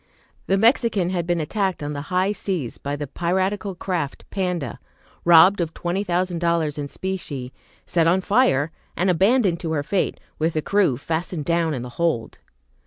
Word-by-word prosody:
The 195 - +3
"Mexican" 220 -4 +3
had 175 -2 -2
been 175 -1 +1
attacked 185 +1 -1
on 145 0 -3
the 145 - -4
high 185 +2 +2
seas 185 - -3
by 140 +1 -3
the 145 0 -4
piratical 190 +6 -1
craft 175 -6 -3
"Panda," 180 - -2 0.5
robbed 175 +3 +7
of 165 -1 -3
twenty 175 +3 -2
thousand 180 -2 -1
dollars 165 -3 0
in 145 - -3
specie, 145 -8 -5 0.3
set 165 -2 +2
on 180 +3 +3
fire, 185 - +2 0.3
and 185 +1 +3
abandoned 195 0 +3
to 165 -3 -3
her 145 -2 0
fate, 190 +5 -1 0.2
with 160 +1 +1
the 155 - 0
crew 195 -11 +2
fastened 160 +2 -3
down 170 -2 +1
in 120 - -4
the 125 - -7
hold. 160 -10 -1
175 Hz, 175 wpm, -23 LUFS, 155-190 Hz, 0.5 s, robbed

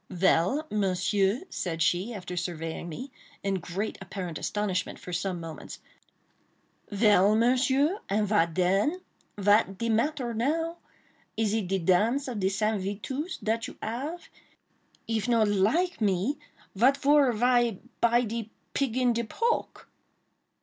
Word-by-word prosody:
"Vell, 185 - +2
Monsieur," 200 +2 +1
said 165 -2 -2
she, 180 +7 +1
after 180 -5 -6
surveying 170 -1 -4
me, 255 - -7 0.3
in 195 -1 0
great 185 +5 -4
apparent 180 -6 -5
astonishment, 205 -3 -2
for 180 - -9
some 180 0 -2
moments—"Vell, 200 +5 -2
Monsieur?—and 255 - +2
vat 170 -6 +2
den?—vat 205 - +1
de 230 +2 -2
matter 240 +2 0
now? 325 +9 -1 0.6
Is 215 -2 +1
it 220 -4 -1
de 195 +2 0
dance 210 +10 +2
of 240 -5 -4
de 190 -1 +2
Saint 215 +1 0
itusse 260 - -4
dat 225 +2 0
you - - -11
ave? 275 +10 -4 0.8
If 225 0 -1
not 230 -3 +4
like 225 - +1
me, 205 +8 +1 0.3
vat 255 +7 +4
for 280 -2 +4
vy 240 -1 +2 0.2
buy 235 +1 +4
de 225 -1 -4 0.2
pig 260 -4 0
in 250 -2 +3
the 235 - 0
poke?" 465 - -2
215 Hz, 130 wpm, -28 LUFS, 190-250 Hz, 0.8 s, not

